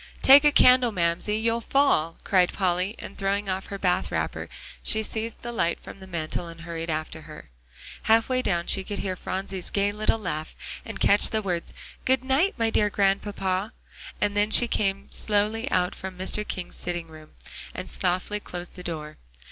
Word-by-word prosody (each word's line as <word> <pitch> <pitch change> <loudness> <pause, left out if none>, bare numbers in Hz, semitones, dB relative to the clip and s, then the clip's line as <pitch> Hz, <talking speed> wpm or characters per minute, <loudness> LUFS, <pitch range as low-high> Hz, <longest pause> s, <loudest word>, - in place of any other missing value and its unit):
"Take 275 +2 +9
a 295 - +6
candle, 250 -3 +6
Mamsie, 175 +3 0
you'll 230 +1 0
fall," 225 - +2
cried 185 -2 +3
Polly, 185 +2 0
and - - -9
throwing 200 +1 -1
on 185 0 -1
her 200 - -7
bath 180 -2 +1
wrapper, - - -2 0.3
she 220 0 +2
seized 225 +1 -4
the 240 - -4
light 170 -7 0
from - - -11
the 190 - -11
mantel 170 -1 -3
and 165 0 -10
hurried 165 0 -5
after 155 0 -3
her. 155 - -12 0.5
Half 225 0 +4
way 255 -1 +1
down 175 -7 0
she 195 - +3
could 205 +1 -5
hear 185 -1 -2
Phronsie's 190 0 -4
gay 200 0 +1
little 215 +2 0
laugh, 155 -7 -4 0.3
and - - -6
catch 205 +1 +5
the 220 -1 -1
words 175 -3 -3 0.3
"Good 260 -1 +2
night, 275 +9 +2
my 225 -1 +1
dear 210 -1 +2
Grandpapa," 195 0 0 0.5
and 205 0 0
then 205 +1 +2
she 240 +2 +7
came 195 -3 -1
slowly 215 +4 0
out 180 -5 +1
from 190 -1 -7
Mr. 200 +3 0
King's 180 -2 -5
sitting 175 -1 -4
room, 155 -1 -14 0.4
and - - -5
softly 180 - -1
closed 180 -3 -8
the 180 - -10
door. 155 -3 -6
195 Hz, 185 wpm, -26 LUFS, 175-220 Hz, 0.5 s, Take